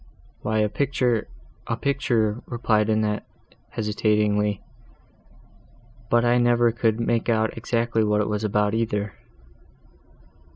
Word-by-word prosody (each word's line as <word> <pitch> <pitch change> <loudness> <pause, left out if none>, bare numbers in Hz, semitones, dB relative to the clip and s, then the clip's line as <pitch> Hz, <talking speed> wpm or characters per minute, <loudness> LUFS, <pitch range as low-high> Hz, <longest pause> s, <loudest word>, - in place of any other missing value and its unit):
"Why 110 +1 -1
a 105 - +3
picture—a 120 -1 -2
picture," 120 -6 0
replied 110 -3 +1
Annette, 110 -1 0 0.5
hesitatingly—"but 105 +2 -3
I 120 +1 +4
never 120 -1 +3
could 115 -1 0
make 115 0 0
out 110 -1 +1
exactly 115 0 0
what 105 0 +2
it 105 - 0
was 105 0 -2
about, 105 0 +1
either." 105 -3 -1
110 Hz, 100 wpm, -24 LUFS, 105-120 Hz, 0.5 s, I